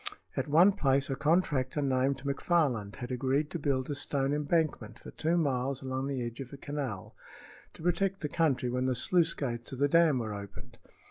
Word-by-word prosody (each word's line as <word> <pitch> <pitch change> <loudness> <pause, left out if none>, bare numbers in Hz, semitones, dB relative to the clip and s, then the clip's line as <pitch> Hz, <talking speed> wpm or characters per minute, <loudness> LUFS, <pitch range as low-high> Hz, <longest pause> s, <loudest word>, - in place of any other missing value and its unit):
At - - -1
one 170 +7 +6
place 140 -7 +1
a - - 0
contractor 150 -2 +1
named 135 -1 +1
McFarland 140 - 0
had 120 0 -6
agreed 135 +4 0
to 170 - -3
build 135 -3 0
a 145 - -2
stone 140 -1 -1
embankment 150 +2 0
for - - -11
two 165 +2 0
miles 135 -3 0
along 130 +1 -2
the 135 -3 -2
edge 120 +2 -7
of 130 -2 -7
a 140 - -8
canal, 135 -9 -5 0.6
to - - -12
protect 190 +2 0
the 150 - -1
country 145 -5 +1
when 125 +1 -1
the 130 - +1
sluice 170 +6 +2
gates 120 -2 -4
of - - -5
the 140 +2 +3
dam 165 -2 +4
were 110 -3 -3
opened. 100 -1 -10
140 Hz, 195 wpm, -30 LUFS, 130-155 Hz, 0.6 s, one